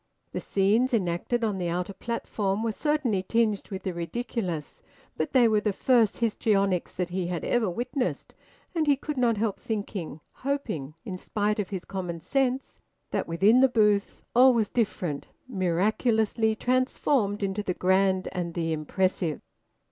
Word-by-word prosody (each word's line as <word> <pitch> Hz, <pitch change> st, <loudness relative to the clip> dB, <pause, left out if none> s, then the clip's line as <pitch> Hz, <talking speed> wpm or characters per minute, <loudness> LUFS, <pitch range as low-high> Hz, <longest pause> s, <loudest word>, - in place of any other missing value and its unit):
The -, -, -3 dB
scenes 220 Hz, +6 st, +2 dB
enacted 195 Hz, +5 st, -1 dB
on 210 Hz, -4 st, 0 dB
the 175 Hz, -1 st, -1 dB
outer 180 Hz, +3 st, -2 dB
platform 210 Hz, -1 st, -2 dB
were 230 Hz, -, 0 dB
certainly 270 Hz, -6 st, 0 dB
tinged 215 Hz, +1 st, 0 dB
with 190 Hz, -2 st, -6 dB
the 185 Hz, -, -2 dB
ridiculous, 175 Hz, -2 st, -4 dB, 0.3 s
but 155 Hz, -, -2 dB
they 245 Hz, -3 st, +5 dB
were 215 Hz, -2 st, +3 dB
the 210 Hz, -, +1 dB
first 230 Hz, 0 st, +3 dB
histrionics 200 Hz, -5 st, +1 dB
that 180 Hz, -1 st, -2 dB
he 180 Hz, 0 st, -2 dB
had 175 Hz, -2 st, -3 dB
ever 230 Hz, -5 st, +1 dB
witnessed; 250 Hz, -, -3 dB, 0.4 s
and 320 Hz, -3 st, 0 dB
he 285 Hz, -, +5 dB
could 295 Hz, +2 st, -5 dB
not 240 Hz, -4 st, +2 dB
help 215 Hz, -1 st, -1 dB
thinking, 200 Hz, -8 st, -4 dB, 0.2 s
hoping, 220 Hz, -, -3 dB
in 185 Hz, -3 st, -5 dB
spite 210 Hz, +2 st, -1 dB
of 200 Hz, -, -2 dB
his 190 Hz, -3 st, -5 dB
common 180 Hz, -3 st, -4 dB
sense, 260 Hz, -, -1 dB, 0.3 s
that -, -, -1 dB
within 195 Hz, +9 st, +4 dB
the 265 Hz, 0 st, +6 dB
booth 210 Hz, -4 st, +2 dB
all 255 Hz, +1 st, +7 dB
was 220 Hz, -3 st, +1 dB
different, 185 Hz, -10 st, -1 dB, 0.2 s
miraculously 220 Hz, +3 st, +1 dB
transformed 250 Hz, -3 st, +1 dB
into 195 Hz, +1 st, -1 dB
the 185 Hz, -3 st, -2 dB
grand 190 Hz, 0 st, +2 dB
and 170 Hz, -2 st, -4 dB
the 165 Hz, -2 st, 0 dB
impressive. 165 Hz, +1 st, -1 dB
205 Hz, 155 wpm, -27 LUFS, 185-235 Hz, 0.4 s, all